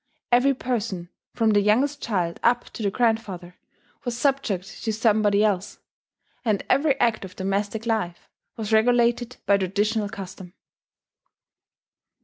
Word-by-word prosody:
Every 260 +3 +4
person, 210 -9 -3 0.3
from 225 -2 +3
the 205 -1 +4
youngest 255 +8 +2
child 180 -6 -1
up 240 +1 +2
to - - -8
the 205 - +1
grandfather, 200 -6 -1 0.5
was 245 -3 -3
subject 230 -8 -1
to 220 - 0
somebody 215 -2 +3
else; 205 -2 0 0.7
and 215 -5 0
every 275 +1 +3
act 230 -3 +2
of 185 -1 -9
domestic 200 +3 -2
life 215 -7 -2 0.3
was 220 -1 -3
regulated 240 +2 +3
by 200 0 +4
traditional 205 +3 0
custom. 190 -3 -9
215 Hz, 125 wpm, -24 LUFS, 195-240 Hz, 0.7 s, Every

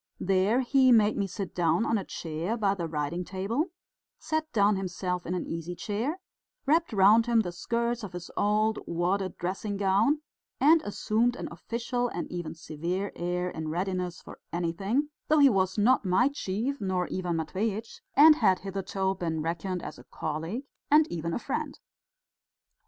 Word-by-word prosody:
There 195 +6 +2
he 260 0 +4
made 215 -2 +5
me 200 -2 0
sit 190 +1 -5
down 175 +6 +2
on - - +1
a - - -4
chair 170 +7 -4
by 200 -3 +2
the 175 -4 -3
writing 155 +3 -2
table, 200 - -1 0.5
sat 315 0 -2
down 205 -3 +3
himself 180 -1 -3
in 180 - -1
an 180 - -2
easy 165 +1 -5
chair, 230 - -2 0.5
wrapped 325 +3 +2
round 215 +3 +5
him 235 -1 +4
the 175 - -4
skirts 235 +6 -1
of 205 -5 -7
his 175 -1 -7
old 215 +1 +2
wadded 180 +2 -1
dressing 195 +3 -3
gown, 205 +10 +2 0.4
and 310 +4 +6
assumed 225 +3 0
an - - -5
official 245 +1 -2
and 175 - -4
even 170 -2 -5
severe 170 +5 -3
air, 180 +1 -2
in 160 0 -5
readiness 180 +1 -2
for - - -11
anything, 195 - -1 0.2
though 310 - +4
he 285 -2 +7
was 190 -1 +1
not 230 +5 +4
my 195 +8 +3
chief 255 +1 -3
nor 185 -2 0
Ivan 180 -2 -1
Matveitch's, 205 +7 -3
and 305 +2 +8
had 190 -7 +3
hitherto 195 0 -2
been 160 -4 -3
reckoned 170 +2 -3
as - - -7
a - - -13
colleague 165 - -4 0.3
and 300 +1 +6
even 170 0 -3
a - - -1
friend. - - -3
195 Hz, 170 wpm, -28 LUFS, 175-230 Hz, 0.5 s, and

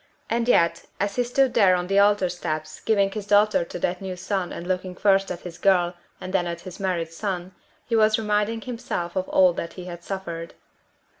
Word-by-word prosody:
And 235 +1 +1
yet, 170 -7 +3
as 200 0 -1
he 245 - +3
stood 250 +1 +2
there 195 -5 +5
on 180 0 -1
the 195 +2 +2
altar 205 -2 +4
steps 155 -3 -4
giving 200 -3 +2
his 205 -1 -6
daughter 205 -2 +4
to 170 - -7
that 175 +1 -2
new 190 -1 -4
son 185 0 -2
and 170 - -6
looking 185 0 -2
first 195 0 +3
at 180 -1 -5
his 170 -1 -9
girl, 180 -2 +3 0.3
and 185 +1 -7
then 175 -2 +1
at 170 0 -5
his 185 0 -10
married 175 -4 -2
son, 185 -1 -3 0.3
he 230 - -1
was 215 -1 +4
reminding 210 +1 0
himself 225 -8 -4
of 185 0 -2
all 185 -2 +5
that 170 - -5
he 180 - -8
had 175 -1 -8
suffered. 170 -4 -6
185 Hz, 210 wpm, -24 LUFS, 175-205 Hz, 0.3 s, there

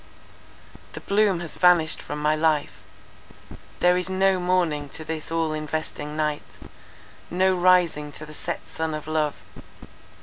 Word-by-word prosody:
'The - - -7
bloom 200 -3 +2
has 170 - -8
vanished 175 -3 +4
from 150 - -6
my 150 +1 +2
life'—there 155 - -2
is 180 +1 -2
no 190 0 +2
morning 175 -5 0
to 155 +3 -6
this 160 0 -5
all 165 -1 0
investing 155 0 -4
night; 150 -1 0 0.9
no 185 +2 +2
rising 175 -5 +3
to 155 - -8
the 155 - -12
set - - -5
sun 160 -1 -3
of 155 - -6
love. 155 -2 0
160 Hz, 135 wpm, -24 LUFS, 150-180 Hz, 0.9 s, vanished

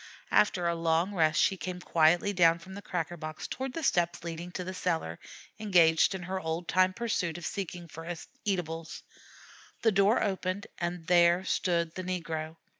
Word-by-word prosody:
After 185 -4 +3
a 170 - +2
long 165 +3 +1
rest 155 -4 +2
she 195 - +3
came 180 0 -5
quietly 175 +3 +3
down 170 -3 +5
from 190 +3 -12
the 200 - -7
cracker 175 -2 -3
box 155 -1 -6
toward 265 0 -4
the 330 - -4
steps 175 - +1
leading 170 +1 -6
to 180 - -3
the 185 +1 -5
cellar, 165 - -2 0.4
engaged 175 -4 +4
in 185 - -6
her 190 +2 -3
old 160 +1 -3
time 185 0 +3
pursuit 185 -6 -2
of 175 - -7
seeking 180 -3 -5
for 165 +2 -7 0.3
eatables. 165 -5 -3 0.8
The 225 - +5
door 200 +3 +3
opened, 190 -1 -2
and 175 -1 -3
there 175 +1 +4
stood 170 -3 0
the 185 - -5
negro. 165 -3 -4
175 Hz, 175 wpm, -30 LUFS, 165-185 Hz, 0.8 s, down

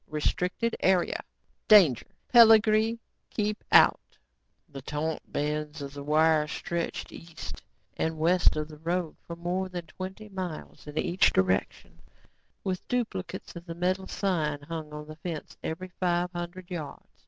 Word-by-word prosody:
Restricted 180 +9 -1
Area. 185 -2 +2 0.5
Danger 180 - +6 0.3
Peligre. 220 -1 +7 0.3
Keep 210 0 -2
Out." - - +5 0.5
The 135 - -9
taut 150 +3 -3
bands 150 +1 -2
of 140 0 -7
wire 155 +2 +3
stretched 170 +2 -3
east 165 -1 -9 0.3
and 160 0 -1
west 175 +3 +4
of 155 0 -2
the 155 -1 -12
road 170 0 -2
for 170 - -5
more 180 +2 -2
than 175 -2 -5
twenty 190 +6 -8
miles 185 -7 -7
in 150 +1 -8
each 175 +4 +3
direction, 95 0 0 0.6
with 185 -2 -3
duplicates 195 -8 -3
of 170 +1 -9
the 165 - -5
metal 185 +2 0
sign 155 -7 -1
hung 155 0 -6
on 150 0 -7
the 155 0 -10
fence 165 -2 -6
every 185 +4 -4
five 180 -1 +1
hundred 175 +1 -7
yards. 160 -5 -6
170 Hz, 140 wpm, -28 LUFS, 155-185 Hz, 0.6 s, Peligre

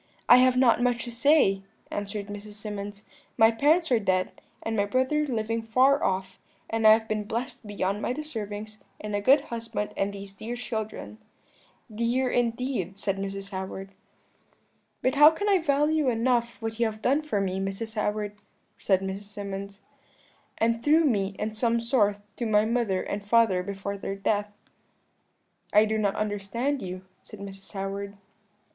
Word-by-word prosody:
"'I 245 - +10
have 255 0 +4
not 245 -2 +4
much 245 -1 +1
to 240 - -6
say,' 235 -6 +4 0.3
answered 205 0 -4
Mrs. 205 +1 -8
Symonds; 205 -1 -7 0.3
'my 225 -1 +6
parents 300 +7 +2
are 240 - +5
dead, 185 -3 +1 0.3
and 225 - -2
my 200 -2 +2
brother 260 +7 +1
living 230 -2 -1
far 255 +5 +3
off: 190 0 -1 0.3
and 225 -1 +3
I 215 - +10
have 220 0 +1
been 215 -1 -1
blessed 235 +1 -4
beyond 200 0 -2
my - - -1
deservings 215 -7 -6 0.2
in 210 0 -5
a 205 - 0
good 270 +7 +5
husband 225 -3 -4
and 195 +1 0
these 200 -1 -9
dear 225 +5 -6
children.' 220 - -5 0.7
"'Dear, 240 +4 +1
indeed,' 235 -5 -1
said 195 -1 -1
Mrs. 195 +1 -5
Howard. 190 0 -6 1.1
"'But 255 - +2
how 295 +2 +9
can 325 +6 -3
I 395 -2 +4
value 300 -1 +2
enough 235 0 0
what 225 0 -4
you 235 - +3
have 215 0 -7
done 280 +4 +3
for 300 -9 -1
me, 190 -1 -1
Mrs. 195 +3 -4
Howard?' 210 -1 -2 0.4
said 190 -2 +2
Mrs. 195 +1 -5
Symonds, 200 -1 -7 0.8
'and 230 +1 +1
through 315 +2 +5
me, 200 -7 +1
in 215 +1 -3
some 230 +1 +1
sort, 230 -4 +2 0.2
to 235 - -2
my 210 0 +3
mother 225 -5 0
and 200 0 -4
father 205 -3 +3
before 200 +1 -5
their 195 - -4
death.' 205 +1 -1 1.2
"'I 210 +1 +7
do 220 0 -1
not 200 -2 +1
understand 215 +7 -2
you,' 185 0 -6 0.2
said 215 - -12
Mrs. 195 0 -10
Howard. 200 +1 -4
215 Hz, 165 wpm, -27 LUFS, 200-240 Hz, 1.2 s, I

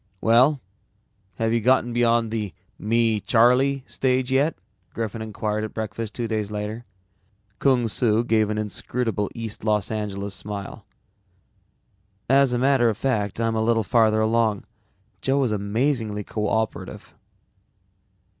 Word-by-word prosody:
"Well, 125 +7 +4 0.8
have 115 +1 0
you 115 - +1
gotten 120 0 +2
beyond 115 -1 +2
the 105 -6 -3 0.2
'me, 115 0 +1
Charlie' 125 +5 +3
stage 130 0 0
yet?" 140 +4 +2 0.4
Griffin 115 -1 -3
inquired 110 0 -3
at 110 - -6
breakfast 110 0 -5
two 120 -2 -2
days 110 -2 -2
later. 105 +3 -5 0.7
Kung 125 -4 +3
Su 115 0 +1
gave 110 -3 +2
an 105 - -2
inscrutable 110 0 -2
East 115 -2 -6
Los 105 -2 0
Angeles 100 -2 -4
smile. 100 +2 -6 1.4
"As 135 0 +4
a 120 - +1
matter 130 -2 +3
of 110 - -2
fact, 105 -6 -1
I'm 115 -1 +1
a 110 - +1
little 115 0 +2
farther 110 0 +3
along. 110 -2 +1 0.6
Joe 135 +1 +1
is 120 - 0
amazingly 105 +1 -1
coöperative." 110 +1 -3
115 Hz, 130 wpm, -24 LUFS, 105-120 Hz, 1.4 s, Well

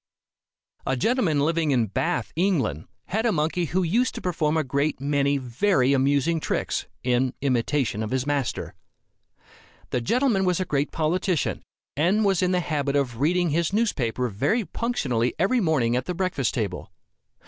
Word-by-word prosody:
A 130 - -1
gentleman 180 - +1
living 160 +1 +1
in 125 -5 +3
Bath, 110 +3 -2
England, 150 - 0 0.2
had 220 +4 0
a - - +3
monkey 160 +1 0
who 180 +4 0
used 230 +10 +1
to - - -5
perform 160 -3 0
a 160 - +2
great 140 +2 -1
many 140 0 +1
very 130 - +1
amusing 140 +4 +2
tricks, - - -2 0.2
in 125 +1 +1
imitation 130 -3 0
of 110 - -3
his 130 +1 -1
master. 145 -3 -2 1.2
The 125 - 0
gentleman 235 - +2
was 180 -1 +1
a 185 - -1
great 145 -2 -1
politician, 170 +1 0 0.3
and 185 +9 +2
was 195 -3 +2
in 180 - +2
the 180 -1 +2
habit 145 -4 -1
of 125 -5 -1
reading 175 +3 +2
his 170 +4 0
newspaper 125 - 0
very 140 - 0
punctually 135 - -1
every 220 +8 +2
morning, 135 - +2
at 125 0 -1
the 180 - -3
breakfast 180 -9 -1
table. 100 -7 -3
150 Hz, 160 wpm, -25 LUFS, 130-180 Hz, 1.2 s, in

